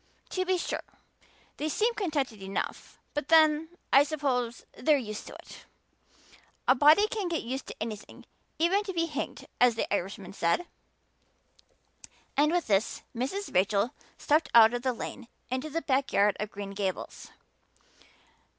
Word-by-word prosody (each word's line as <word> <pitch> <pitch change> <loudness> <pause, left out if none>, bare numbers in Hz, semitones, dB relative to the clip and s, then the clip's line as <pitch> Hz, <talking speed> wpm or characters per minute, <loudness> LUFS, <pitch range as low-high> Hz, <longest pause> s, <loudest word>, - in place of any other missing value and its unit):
To 370 0 -1
be 370 0 +2
sure, - - -3 0.8
they 310 - -2
seem 450 +9 +1
contented 290 - -2
enough; 195 +1 -5 0.2
but 295 -2 -3
then, 315 -1 +5 0.2
I 275 - +8
suppose, 270 -5 -2
they're 295 +3 +3
used 215 -5 -6
to - - -9
it. - - -13 1.0
A - - +7
body 305 +10 +6
can 425 -5 -3
get 335 -2 -2
used 260 +3 -4
to - - -7
anything, 215 -2 -7 0.3
even 360 +6 +2
to 380 - -4
being 335 -1 0
hanged, 290 - -5
as 245 -2 +5
the - - 0
Irishman 195 0 -3
said." 170 - +1 1.7
With 315 +4 +2
this 200 0 0
Mrs. 275 - -3
Rachel 200 +6 +2 0.2
stepped 305 +2 +2
out 225 0 +8
of 245 - -2
the 260 0 +1
lane 240 +1 -7 0.2
into 260 +4 -2
the 330 +2 -3
backyard 250 -7 +2
of 210 0 -3
Green 200 -1 -7
Gables. 195 -2 -4
270 Hz, 145 wpm, -29 LUFS, 220-320 Hz, 1.7 s, I